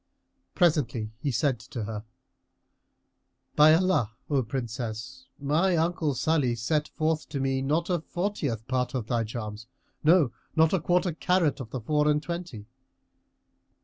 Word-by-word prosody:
Presently 130 - +1
he 145 - -1
said 135 -2 +1
to 120 +1 -6
her, 105 0 -5 1.5
"By 155 +1 +7
Allah, 165 - +1 0.2
O 140 -2 +3
Princess, 120 +1 -5
my 165 +6 +2
uncle 160 -3 0
Salih 135 -2 +1
set 150 +6 0
forth 155 -1 -1
to 140 - -3
me 135 0 0
not 155 +5 0
a 180 -2 +1
fortieth 160 - -3
part 130 0 -1
of 125 -4 -2
thy 120 0 0
charms; 110 -1 -6 0.4
no, 155 -5 +5 0.2
nor 160 0 +5
a 190 - +3
quarter 175 +3 +1
carat[FN#331] 165 -1 +1
of 125 -4 -7
the 125 +1 -5
four 150 +5 +1
and 150 0 +2
twenty." 170 -11 -5
145 Hz, 145 wpm, -27 LUFS, 120-160 Hz, 1.5 s, By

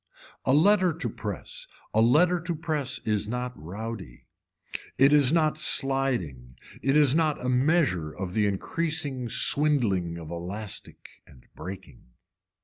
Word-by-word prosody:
A - - +2
letter 185 +4 +4
to 165 - -4
press, - - -6 0.3
a 110 - +3
letter 170 +10 +4
to 170 0 -4
press 150 -5 -2
is 105 -1 0
not 125 +2 -3
rowdy, 95 - -8 0.7
it 135 +3 +5
is 145 -3 +5
not 155 -2 +2
sliding, 125 - 0 0.2
it 135 +2 +2
is 145 -3 +5
not 155 -5 0
a - - 0
measure 130 - +2
of 90 +2 -6
the 105 0 +2
increasing 140 - -2
swindling 110 - +1
of 80 -1 -9
elastic 95 +5 -6 0.2
and 65 - -19
breaking. 95 +4 -9
125 Hz, 135 wpm, -26 LUFS, 95-155 Hz, 0.7 s, it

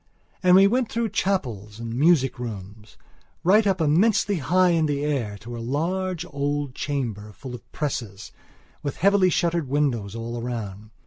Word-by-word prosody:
And 180 -1 +6
we 195 +1 +8
went 240 +3 +1
through 230 -1 -1
chapels, 120 - -2
and 115 -1 -5
music 135 -1 +3
rooms, 105 -2 -8 0.5
right 205 +5 +5
up 190 -2 +1
immensely 190 +6 +3
high 180 +6 +3
in 165 -2 +2
the 145 -1 -1
air 120 -9 -1
to 120 +1 -7
a - - -6
large 170 +8 -2
old 145 -1 -2
chamber, 115 -8 -3
full 130 +3 -9
of 120 - -11
presses, 115 -9 -4 0.5
with 145 - -4
heavily 195 0 +4
shuttered 170 -4 0
windows 125 -8 0
all 115 +1 -5
round. 110 -4 -5
145 Hz, 155 wpm, -24 LUFS, 115-180 Hz, 0.5 s, we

